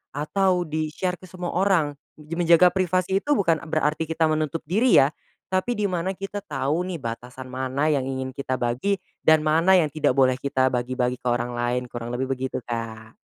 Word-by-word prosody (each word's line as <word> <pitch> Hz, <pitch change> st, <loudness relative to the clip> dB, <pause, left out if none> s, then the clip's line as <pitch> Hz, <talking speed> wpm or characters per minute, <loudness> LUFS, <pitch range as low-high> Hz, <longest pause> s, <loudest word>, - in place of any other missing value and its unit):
atau 180 Hz, +4 st, +1 dB
di-share 155 Hz, +3 st, -2 dB
ke -, -, -13 dB
semua 180 Hz, -1 st, -5 dB
orang, 175 Hz, -6 st, +1 dB, 0.2 s
menjaga 170 Hz, +3 st, +4 dB
privasi 185 Hz, +1 st, +1 dB
itu 295 Hz, +7 st, +1 dB
bukan 165 Hz, -7 st, +2 dB
berarti 155 Hz, 0 st, 0 dB
kita 160 Hz, 0 st, 0 dB
menutup 155 Hz, +1 st, -1 dB
diri 215 Hz, +11 st, +3 dB
ya, 140 Hz, -, +1 dB, 0.4 s
tapi 190 Hz, +6 st, 0 dB
di 210 Hz, -, -2 dB
mana 185 Hz, +2 st, -2 dB
kita 195 Hz, +2 st, -5 dB
tahu 155 Hz, -1 st, -2 dB
nih 170 Hz, -6 st, -5 dB
batasan 125 Hz, +2 st, -7 dB
mana 130 Hz, +3 st, -1 dB
yang 135 Hz, -3 st, 0 dB
ingin 130 Hz, 0 st, -3 dB
kita 130 Hz, -1 st, -3 dB
bagi 125 Hz, +12 st, 0 dB, 0.2 s
dan 160 Hz, -1 st, +4 dB
mana 165 Hz, +5 st, +4 dB
yang 160 Hz, -5 st, +3 dB
tidak 145 Hz, -3 st, +1 dB
boleh 130 Hz, -1 st, +3 dB
kita 130 Hz, -1 st, +1 dB
bagi-bagi 125 Hz, 0 st, -1 dB
ke 125 Hz, -, -5 dB
orang 120 Hz, 0 st, 0 dB
lain 120 Hz, +1 st, 0 dB
kurang 120 Hz, 0 st, -5 dB
lebih 130 Hz, +1 st, -2 dB
begitu 130 Hz, -1 st, -3 dB
Kak. 115 Hz, -1 st, -6 dB
150 Hz, 180 wpm, -24 LUFS, 130-180 Hz, 0.4 s, menjaga